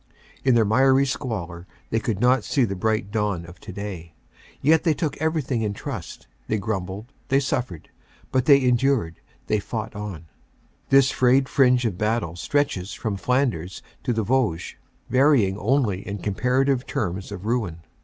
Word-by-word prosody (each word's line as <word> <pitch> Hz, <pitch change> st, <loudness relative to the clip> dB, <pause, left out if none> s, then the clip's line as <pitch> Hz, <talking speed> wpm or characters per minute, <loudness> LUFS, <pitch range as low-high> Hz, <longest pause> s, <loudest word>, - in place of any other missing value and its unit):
In 130 Hz, -2 st, +4 dB
their 115 Hz, -2 st, +4 dB
miry 130 Hz, +5 st, +4 dB
squalor 100 Hz, -, -4 dB, 0.2 s
they 115 Hz, -, +2 dB
could 110 Hz, -3 st, -2 dB
not 125 Hz, 0 st, +3 dB
see 135 Hz, -4 st, +2 dB
the 100 Hz, -3 st, -3 dB
bright 110 Hz, +1 st, -1 dB
dawn 105 Hz, -6 st, -1 dB
of 85 Hz, +2 st, -13 dB
today. 90 Hz, -5 st, -7 dB, 0.4 s
Yet 160 Hz, +3 st, +4 dB
they 160 Hz, -3 st, +2 dB
took 155 Hz, -3 st, -2 dB
everything 155 Hz, -6 st, -1 dB
in 105 Hz, -2 st, -2 dB
trust. -, -, -7 dB, 0.2 s
They 110 Hz, -, 0 dB
grumbled; 100 Hz, +3 st, -4 dB
they 135 Hz, -, +3 dB
suffered; 120 Hz, -, -3 dB, 0.4 s
but 130 Hz, -1 st, +1 dB
they 140 Hz, -2 st, +7 dB
endured; 125 Hz, -8 st, +1 dB, 0.2 s
they 105 Hz, -, +1 dB
fought 110 Hz, +2 st, -5 dB
on. 100 Hz, -6 st, -6 dB, 0.3 s
* -, -, -37 dB
This 135 Hz, -1 st, +5 dB
frayed 130 Hz, +1 st, +3 dB
fringe 125 Hz, -3 st, +3 dB
of 100 Hz, -5 st, -2 dB
battle 105 Hz, -6 st, 0 dB
stretches 100 Hz, -3 st, -1 dB
from 110 Hz, -5 st, -3 dB
Flanders 100 Hz, -, -1 dB, 0.2 s
to -, -, -1 dB
the 110 Hz, -1 st, 0 dB
Vosges, 110 Hz, -7 st, 0 dB, 0.3 s
varying 130 Hz, -8 st, +3 dB
only 110 Hz, -4 st, +1 dB
in 100 Hz, 0 st, -3 dB
comparative 125 Hz, +6 st, 0 dB
terms 95 Hz, 0 st, -3 dB
of 100 Hz, -1 st, -7 dB
ruin. 110 Hz, -8 st, -1 dB
110 Hz, 160 wpm, -24 LUFS, 95-130 Hz, 0.4 s, they